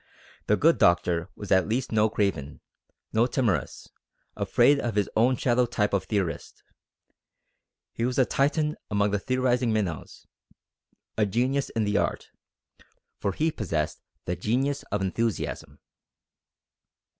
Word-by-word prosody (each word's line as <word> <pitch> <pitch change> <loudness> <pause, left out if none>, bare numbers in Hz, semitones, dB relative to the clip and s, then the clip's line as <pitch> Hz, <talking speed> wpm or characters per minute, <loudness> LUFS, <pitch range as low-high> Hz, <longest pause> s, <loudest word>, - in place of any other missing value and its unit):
The 105 - +3
good 165 +2 +3
doctor 85 0 +2
was 100 - -8
at 95 -1 +4
least 125 +3 -1
no 110 0 +3
craven, 90 -10 -2 0.5
no 115 +2 +3
timorous, 120 -7 -1 0.5
afraid 145 0 +3
of 120 -5 -3
his 105 -2 +2
own 125 +4 +4
shadow 125 0 +2
type 105 -3 -1
of 100 - 0
theorist; 95 -6 -3 1.3
he 115 - -3
was 125 +1 -1
a 130 - +5
Titan 150 +3 0
among 100 0 +1
the 105 - 0
theorising 125 0 +1
minnows, 100 -8 -3 0.9
a 105 - +3
genius 130 +7 0
in 110 - -1
the 105 0 +1
art; - - -2 0.9
for 100 - -1
he 160 - 0
possessed 80 - -3 0.2
the 90 - -2
genius 130 +10 -1
of 105 -1 -1
enthusiasm. 95 -7 -2
110 Hz, 135 wpm, -26 LUFS, 100-125 Hz, 1.3 s, a